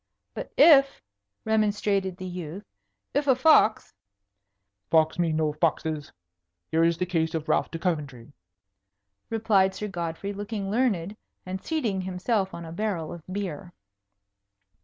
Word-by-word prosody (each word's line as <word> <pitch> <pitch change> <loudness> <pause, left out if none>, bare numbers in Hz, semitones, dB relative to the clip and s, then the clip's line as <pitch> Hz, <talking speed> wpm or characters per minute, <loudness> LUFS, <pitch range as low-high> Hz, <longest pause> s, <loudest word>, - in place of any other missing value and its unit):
"But - - -7
if 275 -4 +6 0.2
" 100 0 -54
remonstrated 205 -3 +1
the 185 - -7
youth, 180 +2 -6 0.5
"if 285 +1 0
a 265 - +5
fox 255 -5 +4 0.5
" 100 0 -54
"Fox 160 +1 +3
me 170 -2 +2
no 155 -1 0
foxes! 155 -1 -1 0.6
Here 160 +1 +3
is 165 0 +2
the 180 - -1
case 165 -2 -1
of 160 -1 -3
Ralph - - +1
de 165 - -5
Coventry," 145 -7 -3 1.0
replied 205 -4 +2
Sir 210 - -4
Godfrey, 175 +1 -4
looking 205 -1 -4
learned, 210 -5 0 0.3
and 185 +1 -5
seating 235 - -1
himself 190 +2 -1
on 170 - -8
a 160 - -8
barrel 180 -4 -3
of 170 - -9
beer. 180 -3 -5
185 Hz, 140 wpm, -26 LUFS, 160-205 Hz, 1.0 s, if